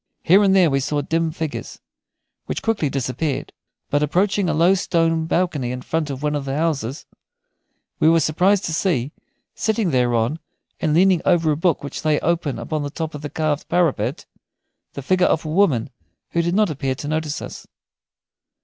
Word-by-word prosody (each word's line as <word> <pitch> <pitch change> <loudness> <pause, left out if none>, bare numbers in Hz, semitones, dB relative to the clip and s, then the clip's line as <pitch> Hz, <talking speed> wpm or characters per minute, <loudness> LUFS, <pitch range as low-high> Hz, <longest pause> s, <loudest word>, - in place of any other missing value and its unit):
Here 190 +5 +6
and 195 -1 +4
there 180 -5 +5
we 135 - +2
saw 145 +2 -1
dim 165 +2 0
figures, 160 -2 -5 0.7
which - - -4
quickly 220 -10 0
disappeared; 135 +2 -3 0.4
but, 145 - +2
approaching 185 +5 +1
a - - +1
low 170 +4 +4
stone 165 -3 +1
balcony 160 -8 0
in 125 0 -5
front 160 -2 -2
of 135 0 -5
one 150 0 0
of 145 -2 -2
the 135 +1 -2
houses, 150 -5 -2 0.9
we 155 - +5
were 165 0 +5
surprised 180 +6 +2
to 165 - -3
see, 150 -7 0 0.4
sitting 220 -4 0
thereon 120 +2 +1 0.4
and 155 -2 +1
leaning 185 0 +4
over 170 -4 +3
a - - +1
book 165 0 0
which 140 - -6
lay 155 -2 +2
open 160 -7 0
upon 150 +6 -3
the 145 - -3
top 160 +1 -5
of 145 - -7
the 145 - -5
carved 155 -1 -2
parapet, 170 -4 0 0.7
the 140 - -7
figure 185 +5 +3
of 160 - 0
a - - -4
woman 155 - +2 0.4
who 170 - +1
did 170 +2 -1
not 210 -4 +3
appear 135 -2 -2
to 145 - -7
notice 155 -1 -2
us. - - -9
155 Hz, 185 wpm, -21 LUFS, 145-175 Hz, 0.9 s, Here